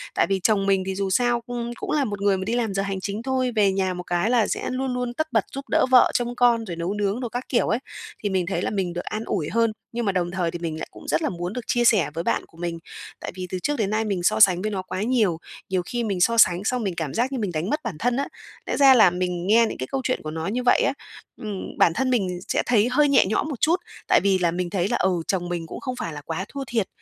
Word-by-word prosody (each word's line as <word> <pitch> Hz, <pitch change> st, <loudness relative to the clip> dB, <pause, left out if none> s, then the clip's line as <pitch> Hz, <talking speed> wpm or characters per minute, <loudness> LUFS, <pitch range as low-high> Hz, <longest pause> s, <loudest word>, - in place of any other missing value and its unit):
Tại -, -, +3 dB
vì 195 Hz, -1 st, +1 dB
chồng 200 Hz, -2 st, +3 dB
mình 195 Hz, -1 st, +2 dB
thì 190 Hz, 0 st, -3 dB
dù 195 Hz, 0 st, -1 dB
sao 240 Hz, +3 st, +2 dB
cung 235 Hz, 0 st, -5 dB
cũng -, -, -5 dB
là 295 Hz, -2 st, +2 dB
một 205 Hz, -3 st, -5 dB
người 200 Hz, -1 st, +3 dB
mà 190 Hz, -, -3 dB
đi 225 Hz, -, -1 dB
làm 230 Hz, -4 st, 0 dB
giờ 195 Hz, -, 0 dB
hành 195 Hz, -1 st, -3 dB
chính 205 Hz, +2 st, -3 dB
thôi, 260 Hz, -1 st, 0 dB
về 205 Hz, -2 st, +4 dB
nhà 190 Hz, -1 st, 0 dB
một 180 Hz, 0 st, -6 dB
cái 175 Hz, +5 st, 0 dB
là 240 Hz, -3 st, +3 dB
sẽ -, -, -2 dB
luôn 260 Hz, 0 st, -2 dB
luôn 250 Hz, -1 st, -2 dB
tất 315 Hz, +5 st, -2 dB
bật -, -, +2 dB
giúp 275 Hz, +1 st, -5 dB
đỡ -, -, +3 dB
vợ 250 Hz, -1 st, +7 dB
trông 245 Hz, 0 st, -1 dB
con, 235 Hz, -2 st, +3 dB
rồi 175 Hz, -, -5 dB
nấu 170 Hz, +3 st, -2 dB
nướng 205 Hz, +2 st, -1 dB
đồ 245 Hz, -2 st, -3 dB
các 245 Hz, +2 st, -4 dB
kiểu 240 Hz, -, +2 dB
ấy. 225 Hz, -, +1 dB, 0.4 s
Thì 205 Hz, -, 0 dB
mình 190 Hz, -2 st, 0 dB
thấy 190 Hz, -, -2 dB
là -, -, -1 dB
mình 190 Hz, -4 st, -2 dB
được 175 Hz, -, -4 dB
an 215 Hz, +1 st, -4 dB
ủi 165 Hz, -7 st, -2 dB
hơn, 230 Hz, -1 st, +2 dB, 0.2 s
nhưng 235 Hz, 0 st, -2 dB
mà 200 Hz, -, +2 dB
đồng 175 Hz, -2 st, -1 dB
thời 180 Hz, -3 st, -1 dB
thì 175 Hz, -, -6 dB
mình 160 Hz, -2 st, -4 dB
lại -, -, -5 dB
cũng -, -, -13 dB
rất 155 Hz, -, +1 dB
là -, -, 0 dB
muốn 175 Hz, +2 st, -4 dB
được 250 Hz, -, -4 dB
chia 240 Hz, -1 st, +2 dB
sẻ 215 Hz, -9 st, +4 dB
với 165 Hz, +1 st, -3 dB
bạn -, -, 0 dB
của 165 Hz, -, -22 dB
mình, 170 Hz, -1 st, -4 dB, 0.4 s
tại -, -, -6 dB
vì 185 Hz, -1 st, -5 dB
từ 185 Hz, -, -3 dB
trước 295 Hz, +9 st, -1 dB
đến 210 Hz, -4 st, 0 dB
nay 215 Hz, +1 st, 0 dB
mình 195 Hz, -4 st, -2 dB
so 175 Hz, -, +2 dB
sánh 185 Hz, -4 st, +6 dB
với 215 Hz, +2 st, -2 dB
nó 190 Hz, -2 st, -2 dB
quá 185 Hz, 0 st, -5 dB
nhiều, 215 Hz, -8 st, +2 dB, 0.3 s
nhiều 185 Hz, -1 st, +1 dB
khi 240 Hz, +4 st, -2 dB
mình 195 Hz, -5 st, -2 dB
so 230 Hz, +5 st, +3 dB
sánh 180 Hz, -4 st, +5 dB
xong 245 Hz, +2 st, 0 dB
mình 190 Hz, -4 st, -2 dB
cảm 160 Hz, -5 st, -3 dB
giác 250 Hz, +4 st, 0 dB
như 265 Hz, -, -2 dB
mình 205 Hz, -5 st, -2 dB
đánh 160 Hz, +5 st, -2 dB
mất 300 Hz, -, 0 dB
bản 230 Hz, -8 st, -4 dB
thân 245 Hz, +6 st, +1 dB
á. 280 Hz, -, -1 dB, 0.4 s
Lẽ -, -, -2 dB
ra 275 Hz, -2 st, +8 dB
là 215 Hz, -7 st, +7 dB
mình 180 Hz, 0 st, -2 dB
nghe 230 Hz, +3 st, +5 dB
những -, -, -6 dB
cái -, -, -4 dB
câu 270 Hz, -1 st, -1 dB
chuyện 255 Hz, -, 0 dB
của 155 Hz, -, -4 dB
nó 160 Hz, +1 st, -4 dB
như 240 Hz, +5 st, -2 dB
vậy 245 Hz, -, +4 dB
á, -, -, +1 dB, 0.5 s
ừm, 205 Hz, -3 st, -6 dB
bản 170 Hz, -, +4 dB
thân 255 Hz, +8 st, 0 dB
mình 190 Hz, -8 st, 0 dB
sẽ -, -, +1 dB
thấy 230 Hz, -2 st, +3 dB
hơi 290 Hz, +3 st, +3 dB
nhẹ 275 Hz, -, +5 dB
nhõm 215 Hz, +9 st, 0 dB
một 275 Hz, -6 st, -6 dB
chút, 325 Hz, +3 st, +4 dB, 0.3 s
tại -, -, +5 dB
vì 195 Hz, -1 st, +3 dB
là 175 Hz, -2 st, +2 dB
mình 175 Hz, +1 st, -2 dB
thấy 185 Hz, 0 st, 0 dB
là, 240 Hz, -, +1 dB
ừ, 190 Hz, -, +2 dB, 0.2 s
chồng 175 Hz, -2 st, -1 dB
mình 170 Hz, -2 st, -3 dB
cũng -, -, -7 dB
không 255 Hz, -2 st, -4 dB
phải 170 Hz, -9 st, -5 dB
là 145 Hz, -, -7 dB
quá 165 Hz, +5 st, -4 dB
thua 280 Hz, -1 st, -5 dB
thiệt, 225 Hz, -5 st, 0 dB
205 Hz, 305 wpm, -24 LUFS, 180-240 Hz, 0.5 s, ra